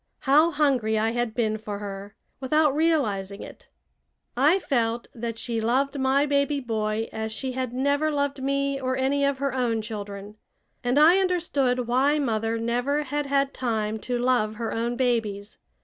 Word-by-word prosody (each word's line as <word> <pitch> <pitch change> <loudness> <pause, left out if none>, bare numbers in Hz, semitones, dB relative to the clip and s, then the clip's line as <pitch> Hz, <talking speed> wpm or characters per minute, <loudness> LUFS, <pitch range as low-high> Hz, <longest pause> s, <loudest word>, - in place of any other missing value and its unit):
How 300 +4 +5
hungry 270 -8 +1
I 220 +1 +1
had 240 -1 -2
been 220 -2 0
for 210 -1 -5
her, 200 0 -7 0.2
without 300 +2 +2
realizing 215 -12 0
it! - - -12 0.7
I 295 +9 +4
felt 235 -9 -1
that 230 -1 -5
she 230 -1 -3
loved 275 +5 0
my 265 +2 +3
baby 285 0 +1
boy 220 -3 -2
as 220 0 -3
she 255 +5 -4
had 255 -1 -3
never 285 +4 +1
loved 285 -2 -1
me 275 0 0
or 260 0 -1
any 275 +2 +1
of 280 -1 +1
her 275 -1 -2
own 240 -3 0
children. 205 -1 -7 0.5
And 245 +2 +1
I 330 +6 +7
understood 290 -9 0
why 265 +5 +2
mother 225 -5 -1
never 245 +6 0
had 290 +1 -3
had 275 0 +1
time 220 -3 -2
to 245 +3 -2
love 240 -3 +1
her 225 0 -3
own 235 +1 -1
babies. 220 -5 -1
250 Hz, 165 wpm, -25 LUFS, 225-280 Hz, 0.7 s, I